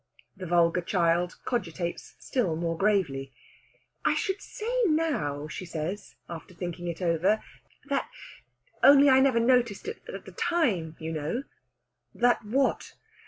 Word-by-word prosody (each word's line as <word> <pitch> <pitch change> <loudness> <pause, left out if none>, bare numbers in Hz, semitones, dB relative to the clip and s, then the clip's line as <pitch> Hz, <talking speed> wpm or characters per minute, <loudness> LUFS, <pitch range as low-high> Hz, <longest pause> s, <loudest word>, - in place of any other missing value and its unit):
The 185 -2 -7
vulgar 170 +1 +3
child 175 0 +1
cogitates 175 -7 -3
still 210 -11 -1
more 165 0 -1
gravely. 165 -9 0 0.7
"I - - +3
should 390 0 -1
say 430 - -7 0.2
now," 280 - 0
she 165 - -6
says, 175 +3 -5
after 170 +1 -9
thinking 175 0 -5
it 170 +1 -4
over, 175 +5 +2 0.4
"that 280 -1 -1 0.7
only 280 0 +8
I 260 - +6
never 265 -3 +4
noticed 240 - +2
it 445 - -5
at - - -8
the - - -10
time, 230 - 0
you 160 0 -5
know 160 - -2 0.4
" - - -44
"That 245 0 +3
what?" 260 +6 0
185 Hz, 140 wpm, -28 LUFS, 165-255 Hz, 0.7 s, only